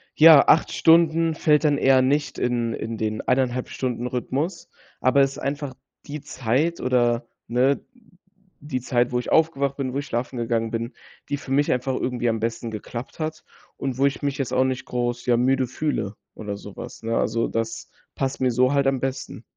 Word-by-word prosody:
ja, 155 Hz, -2 st, +8 dB
8 160 Hz, -, +4 dB
Stunden 165 Hz, -1 st, +4 dB
fällt 155 Hz, -1 st, +3 dB
dann 145 Hz, -1 st, +3 dB
eher 135 Hz, -1 st, +5 dB
nicht 145 Hz, +3 st, 0 dB
in 120 Hz, -2 st, 0 dB
in 115 Hz, 0 st, -5 dB
den 110 Hz, 0 st, -2 dB
1,5 125 Hz, -1 st, 0 dB
Stunden 125 Hz, -2 st, -3 dB
Rhythmus, 140 Hz, +8 st, -3 dB, 0.3 s
aber 130 Hz, +2 st, +4 dB
es 135 Hz, 0 st, +3 dB
ist -, -, -11 dB
einfach 140 Hz, -1 st, -3 dB, 0.3 s
die 150 Hz, 0 st, -6 dB
Zeit, 140 Hz, +4 st, -1 dB
oder 120 Hz, -2 st, +1 dB, 0.2 s
ne, 130 Hz, +4 st, +2 dB, 0.8 s
die 140 Hz, -3 st, -4 dB
Zeit, 120 Hz, -1 st, +1 dB
wo 125 Hz, -, +1 dB
ich 125 Hz, -, -5 dB
aufgewacht 140 Hz, -4 st, +2 dB
bin, 130 Hz, -2 st, -3 dB
wo 140 Hz, -, -1 dB
ich 145 Hz, -, -5 dB
schlafen 120 Hz, +2 st, -3 dB
gegangen 115 Hz, -1 st, -1 dB
bin, 115 Hz, +2 st, -3 dB, 0.4 s
die 145 Hz, -, -1 dB
für 140 Hz, -, -10 dB
mich 145 Hz, +2 st, +2 dB
einfach 125 Hz, +1 st, 0 dB
irgendwie 125 Hz, -2 st, -1 dB
am 115 Hz, -1 st, -1 dB
besten 115 Hz, +1 st, -3 dB
geklappt 115 Hz, +6 st, -7 dB
hat 155 Hz, 0 st, -4 dB, 0.3 s
und 135 Hz, -2 st, -3 dB
wo 135 Hz, -, +4 dB
ich 140 Hz, -, -3 dB
mich 140 Hz, -1 st, -1 dB
jetzt 135 Hz, -, -2 dB
auch 130 Hz, -, +4 dB
nicht 130 Hz, -1 st, -2 dB
groß, 120 Hz, 0 st, -2 dB
ja, 120 Hz, -1 st, +4 dB
müde 130 Hz, +1 st, +2 dB
fühle 125 Hz, -6 st, -2 dB, 0.2 s
oder 105 Hz, -2 st, -6 dB
sowas, 100 Hz, +2 st, -10 dB
ne? 115 Hz, +1 st, -1 dB
Also, 115 Hz, 0 st, 0 dB
das 115 Hz, 0 st, -3 dB, 0.3 s
passt 135 Hz, 0 st, -2 dB
mir 130 Hz, -1 st, +3 dB
so 130 Hz, +3 st, +3 dB
halt 140 Hz, -1 st, +2 dB
am 135 Hz, -1 st, +1 dB
besten. 135 Hz, 0 st, -4 dB
130 Hz, 195 wpm, -24 LUFS, 120-140 Hz, 0.8 s, ja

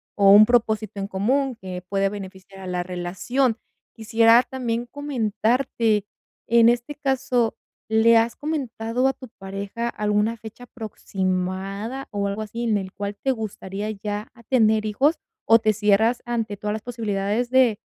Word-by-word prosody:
o 200 Hz, -1 st, +5 dB
un 215 Hz, +1 st, +9 dB
propósito 220 Hz, -3 st, +1 dB
en 195 Hz, -, -3 dB
común 250 Hz, +7 st, 0 dB
que 185 Hz, -3 st, -7 dB
puede 195 Hz, 0 st, +1 dB
beneficiar 195 Hz, -1 st, -9 dB
a 190 Hz, -, -8 dB
la 180 Hz, -1 st, -2 dB
relación. 185 Hz, +8 st, -1 dB, 0.4 s
Quisiera 230 Hz, +2 st, +5 dB
también 240 Hz, -2 st, -3 dB
comentarte, 235 Hz, -4 st, 0 dB, 0.4 s
en 235 Hz, 0 st, +5 dB
este 240 Hz, +4 st, -1 dB
caso, 265 Hz, -5 st, 0 dB, 0.3 s
¿le 225 Hz, +1 st, +5 dB
has 230 Hz, +1 st, +1 dB
comentado 255 Hz, -5 st, -2 dB
a 270 Hz, -, +1 dB
tu 255 Hz, -2 st, -12 dB
pareja 200 Hz, +4 st, -4 dB
alguna 210 Hz, +2 st, 0 dB
fecha 225 Hz, +3 st, -11 dB
aproximada 195 Hz, +2 st, -4 dB
o 200 Hz, -1 st, -1 dB
algo 205 Hz, +2 st, -3 dB
así, 230 Hz, +3 st, -5 dB
en 215 Hz, -2 st, +2 dB
el 190 Hz, -1 st, -5 dB
cual 200 Hz, 0 st, -4 dB
te 270 Hz, -, -1 dB
gustaría 210 Hz, -2 st, -5 dB
ya 210 Hz, 0 st, -4 dB
a 235 Hz, -, -17 dB
tener 220 Hz, -3 st, +3 dB
hijos, 270 Hz, +10 st, +2 dB, 0.3 s
o 225 Hz, -, +7 dB
te 215 Hz, -1 st, +1 dB
cierras 215 Hz, +3 st, +2 dB
ante 230 Hz, -3 st, -2 dB
todas 210 Hz, +1 st, -3 dB
las 220 Hz, -, -5 dB
posibilidades 220 Hz, 0 st, -2 dB
de, 250 Hz, -5 st, +4 dB
220 Hz, 155 wpm, -23 LUFS, 200-240 Hz, 0.4 s, un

